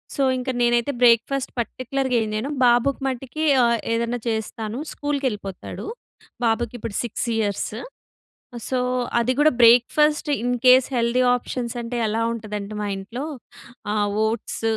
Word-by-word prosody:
So, 280 - +1
ఇంక 255 +1 -4
నేనైతే 240 +2 +2
breakfast 245 +3 +3
పర్టిక్యులర్‌గా 255 +2 -2
ఏం 215 - -4
చేయను. 240 +7 -2
బాబుకు 245 +4 +3
మట్టుకి 265 +4 -4 0.2
ఆహ్, 235 -1 +2
ఏదన్నా 235 +1 -1
చేస్తాను 220 +1 -3
స్కూల్‌కెళ్ళిపోతాడు. 260 -10 -4 0.6
బాబుకి 230 0 0
ఇప్పుడు 220 -2 -6
6 240 +1 -3
ఇయర్స్ 205 -2 -1 1.0
సో, 255 - 0 0.4
అది 240 +2 +1
గుడా 310 -1 +5
breakfast 295 +7 +5
in 245 +1 0
case 255 0 +7
healthy 235 +2 +2
options 245 -1 -5
అంటే 235 +1 -5
ఎలా 225 +2 0
ఉంటదంటే 210 -2 -6
మా 205 - -2
ఇంట్లో, 230 +8 -6 0.7
ఆహ్, 205 -1 +1 0.2
ఓట్స్ 225 0 -3
240 Hz, 130 wpm, -23 LUFS, 225-255 Hz, 1.0 s, case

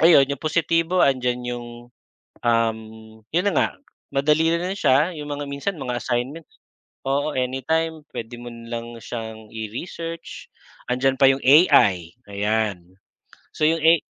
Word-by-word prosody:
ayun 155 -5 +7
'yong 140 - -2
positibo, 165 +2 +1
andiyan 125 -2 +1
'yong, 120 -1 -5 0.8
um, 115 -1 +2 0.5
'yon 175 +4 +2
na - - -3
nga, - - +4 0.5
madali 150 +4 +3
na 180 +3 -1
siya, 150 +2 +3
'yong 150 - -6
mga 145 0 -4
minsan 150 +6 -3
mga 125 -2 -3
assignment, 130 +6 -2 0.6
oo 145 +2 0
anytime 155 +6 -1
puwede 115 +1 -6
mo 120 - -8
lang 115 0 -7
siyang 110 -2 -7
i-research. 165 - -6 0.4
Andiyan 130 +1 +1
pa 135 - +8
'yong 135 0 0
AI, 100 - +5 0.2
ayan. 100 -3 -1 0.6
So 155 - +1
'yong 165 0 +1
A 165 0 +6
135 Hz, 135 wpm, -23 LUFS, 115-160 Hz, 0.8 s, pa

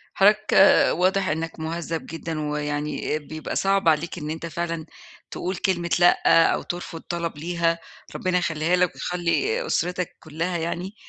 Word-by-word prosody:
حضرتك 210 +2 +4
آآ، 195 - +6
واضح 185 +3 +2
إنك 160 +1 -3
مهذّب 165 0 -4
جدًا، 165 -1 -5
ويعني 150 +1 -2
بيبقى 155 +1 -6
صعب 195 -2 +2
عليك 160 +3 0
إن 150 -3 -5
أنت 160 +1 -4
فعلًا 170 -1 -3 0.5
تقُول 185 +2 -3
كلمة 175 -2 -1
لأ، 175 -1 +5
أو - - -2
ترفض 175 -1 -6
طلب 170 -3 -4
ليها، 170 +1 0 0.4
ربنا 185 -1 0
يخلّيها 165 0 +1
لك 180 -1 +2
ويخلّي 390 - -1
أسرتك 180 - -1
كلّها 165 +3 -3
يعني، 170 +4 -3
170 Hz, 145 wpm, -24 LUFS, 160-180 Hz, 0.5 s, آآ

